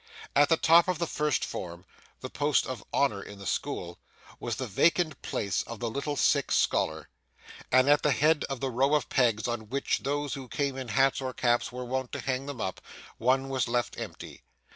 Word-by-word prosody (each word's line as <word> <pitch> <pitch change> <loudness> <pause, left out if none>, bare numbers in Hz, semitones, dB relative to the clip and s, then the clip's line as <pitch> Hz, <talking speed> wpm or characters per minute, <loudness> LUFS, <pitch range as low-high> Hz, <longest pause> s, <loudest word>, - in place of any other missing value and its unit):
At 145 +1 +5
the 165 - +4
top 165 +2 +5
of 180 -2 0
the 170 - -1
first 150 -3 0
form 85 +1 -7 0.4
the - - -5
post 145 0 +1
of 130 -5 -6
honour 135 -8 +1
in 100 - -10
the 100 - -10
school 85 -1 -3 0.4
was - - -3
the 130 - -3
vacant 155 - +1
place 100 -3 -1
of 115 -2 -8
the 115 -2 -2
little 145 +3 -3
sick 135 - +2
scholar, - - +1 0.6
and 130 +1 +5
at 145 0 +5
the 150 - +2
head 150 +2 +3
of 135 -3 -5
the 135 -1 -1
row 135 +5 +2
of 150 - -1
pegs 115 -5 +2
on 115 -3 -4
which 140 +3 0
those 145 0 -2
who 135 -2 -6
came 135 +4 -2
in 130 -2 -5
hats 135 +4 +2
or 130 -1 -4
caps 120 -1 +1
were 125 0 -6
wont 130 0 -3
to - - -3
hang 135 +1 -2
them 140 -4 -6
up, 95 -3 -3 0.4
one 130 +3 +2
was 130 -2 -1
left 120 -1 -1
empty. - - -8
130 Hz, 205 wpm, -28 LUFS, 120-145 Hz, 0.6 s, At